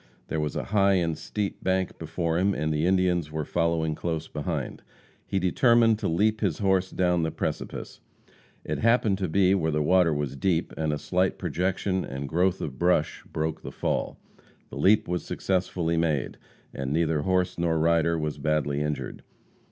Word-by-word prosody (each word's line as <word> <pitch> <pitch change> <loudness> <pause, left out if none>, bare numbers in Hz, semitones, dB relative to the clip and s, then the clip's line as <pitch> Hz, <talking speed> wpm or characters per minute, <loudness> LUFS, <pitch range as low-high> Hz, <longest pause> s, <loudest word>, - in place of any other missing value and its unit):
There 80 - -1
was 75 -1 -2
a - - -2
high 100 -1 +3
and 85 -3 +1
steep 105 +4 -4
bank 95 0 0
before 80 +1 -1
him, 100 +2 +2
and 75 0 -1
the 75 +3 +1
Indians 90 -4 +1
were 80 -1 -3
following 85 -1 0
close 80 0 -3
behind. - - -4 0.5
He 95 - -1
determined 115 +4 +4
to - - -1
leap 105 +6 +1
his 95 -8 0
horse 95 -2 +1
down 90 -2 +1
the 80 - 0
precipice. - - -5 0.7
It - - -2
happened 115 -4 +3
to 95 - -1
be 95 +3 +3
where 80 -5 +1
the 75 -1 0
water 90 +1 +4
was 75 -2 -2
deep, 85 +2 0
and 80 -1 -1
a 75 - -1
slight 90 +4 0
projection 95 +1 -1
and 70 +1 -5
growth 90 +4 +1
of 65 -3 -5
brush 85 -3 +1
broke 80 0 -2
the - - -7
fall. - - -2 0.5
The - - -7
leap 105 +2 +4
was 90 0 -2
successfully 90 -3 -1
made, 80 -5 -1 0.3
and 65 0 -4
neither 80 -1 +1
horse 90 +1 0
nor 85 -1 +1
rider 85 +1 +2
was 75 -2 -3
badly 75 -1 0
injured. 75 0 -3
85 Hz, 175 wpm, -26 LUFS, 80-95 Hz, 0.7 s, determined